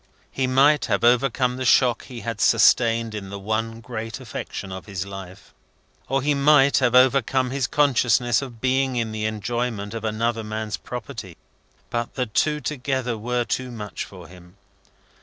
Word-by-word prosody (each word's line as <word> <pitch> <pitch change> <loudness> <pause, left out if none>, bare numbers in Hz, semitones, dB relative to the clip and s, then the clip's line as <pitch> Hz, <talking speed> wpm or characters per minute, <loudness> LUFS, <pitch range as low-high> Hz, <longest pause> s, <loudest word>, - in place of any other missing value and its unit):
He 130 -1 -1
might 140 +3 +4
have 100 -2 0
overcome 125 +1 +2
the 130 - -3
shock 125 -1 +3
he 120 -3 -9
had 115 -3 -4
sustained 115 -2 +4
in 100 -2 -6
the 100 - -6
one 110 +3 -3
great 115 -2 -6
affection 95 - -6
of 95 +2 -8
his 100 -2 -4
life, 95 -1 -10 0.6
or 135 0 0
he 145 +1 +2
might 140 0 +5
have 125 -2 +2
overcome 130 0 +3
his 135 -2 -1
consciousness 120 -4 +2
of 125 -4 -8
being 130 +1 +1
in 115 -2 -1
the 110 0 -3
enjoyment 110 0 -3
of 115 -1 -5
another 115 +1 -1
man's 110 0 -4
property; 125 -4 -8 0.5
but 120 0 -3
the 125 - 0
two 150 +7 0
together 130 -3 -2
were 120 +2 -2
too 130 +3 -2
much 105 -4 -6
for 90 -4 -12
him. 90 +1 -16
120 Hz, 165 wpm, -23 LUFS, 110-130 Hz, 0.6 s, might